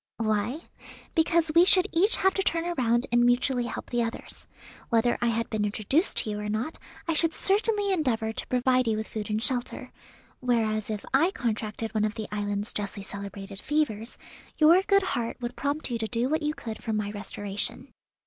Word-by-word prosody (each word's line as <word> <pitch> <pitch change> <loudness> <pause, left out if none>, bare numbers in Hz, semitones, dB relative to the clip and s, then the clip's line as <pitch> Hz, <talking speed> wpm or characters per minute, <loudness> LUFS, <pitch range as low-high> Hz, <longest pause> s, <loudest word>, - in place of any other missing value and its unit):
"Why? 220 +6 -1 0.5
Because 325 0 +2
we 335 +2 +7
should 370 0 +5
each 385 +7 +4
have 385 0 +2
to 390 - 0
turn 335 -3 +1
around 250 -8 +1
and 240 0 +4
mutually 245 +1 +2
help - - -6
the 240 -1 +1
others. 230 0 -5 0.4
Whether 235 0 +3
I 240 - +2
had 230 0 0
been 215 -2 0
introduced 215 - 0
to 215 - +1
you 210 - -3
or 210 0 -4
not, 225 +9 -3 0.3
I 330 - +1
should 325 +1 +2
certainly 410 0 +2
endeavour 235 -10 0
to - - -4
provide 255 0 +2
you 220 -1 +1
with 220 - -4
food 215 -1 -5
and 215 +1 0
shelter; 250 -3 -2 0.5
whereas 220 -4 0
if 210 -2 -4
I 310 +7 +4
contracted 225 - -3
one 215 -1 +1
of 215 0 -1
the 215 - -5
island's 205 0 -2
justly 200 -1 -3
celebrated 200 0 -7
fevers, 255 -7 -1 0.4
your 330 +4 +6
good 395 -1 +4
heart 235 -10 -2
would 240 0 -5
prompt 285 -1 -2
you 235 - -1
to 220 - -1
do 240 +3 -1
what 315 +2 +1
you 300 0 -1
could 220 -2 -7
for 225 - -3
my 210 -1 -1
restoration. 205 -1 -4
235 Hz, 195 wpm, -27 LUFS, 215-305 Hz, 0.5 s, we